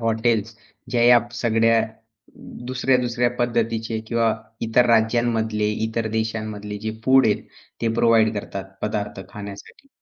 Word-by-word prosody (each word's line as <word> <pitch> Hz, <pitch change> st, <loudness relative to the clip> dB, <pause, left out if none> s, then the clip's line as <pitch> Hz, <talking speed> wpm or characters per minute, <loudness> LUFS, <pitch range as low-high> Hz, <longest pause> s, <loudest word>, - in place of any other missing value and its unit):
Hotels 115 Hz, -1 st, 0 dB, 0.4 s
ज्या 120 Hz, -1 st, +2 dB
या 120 Hz, 0 st, +8 dB, 0.2 s
सगळ्या 115 Hz, -1 st, +3 dB, 0.9 s
दुसऱ्या-दुसऱ्या 125 Hz, -2 st, +1 dB
पद्धतीचे 115 Hz, -2 st, -1 dB
किंवा 115 Hz, -1 st, +1 dB, 0.3 s
इतर 115 Hz, +2 st, +3 dB
राज्यांमधले 110 Hz, -2 st, +2 dB, 0.2 s
इतर 110 Hz, 0 st, -2 dB
देशांमधले 110 Hz, -2 st, -3 dB
जे 110 Hz, +1 st, -3 dB
फूड 130 Hz, -1 st, +5 dB
आहेत, 105 Hz, -, +1 dB, 0.4 s
ते 115 Hz, -, +1 dB
प्रोव्हाईड 115 Hz, -1 st, +4 dB
करतात 100 Hz, -1 st, -6 dB, 0.2 s
पदार्थ 105 Hz, -2 st, -3 dB
खाण्यासाठी. 100 Hz, -, -10 dB
115 Hz, 115 wpm, -22 LUFS, 110-120 Hz, 0.9 s, या